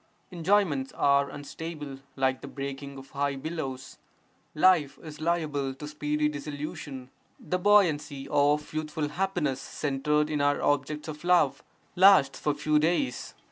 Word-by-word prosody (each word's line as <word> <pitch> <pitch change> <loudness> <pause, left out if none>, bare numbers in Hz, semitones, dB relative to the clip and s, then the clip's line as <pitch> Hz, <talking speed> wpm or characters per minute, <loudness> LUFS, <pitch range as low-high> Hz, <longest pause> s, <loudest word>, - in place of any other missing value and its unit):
Enjoyments 170 -6 +1
are 140 0 +3
unstable 145 -1 -7 0.2
like 130 -1 0
the - - -8
breaking 140 0 -6
of 135 0 -12
high 140 0 -1
billows, 135 -3 -6 0.6
life 155 -4 +4
is 155 -1 -9
liable 150 -5 -1
to 150 +2 -8
speedy 150 0 -1
dissolution; 145 -3 -6 0.3
the 180 - -2
buoyancy 155 -8 +3
of 145 +1 +2
youthful 155 -1 -2
happiness 155 -6 -1
centred 150 +2 -1
in 150 -1 0
our 145 0 +2
objects 145 +2 0
of 155 0 -7
love 175 -6 +3 0.3
lasts 180 -8 +6
for 150 -1 0
few 150 +1 +2
days. 175 - -1
150 Hz, 135 wpm, -28 LUFS, 140-160 Hz, 0.6 s, lasts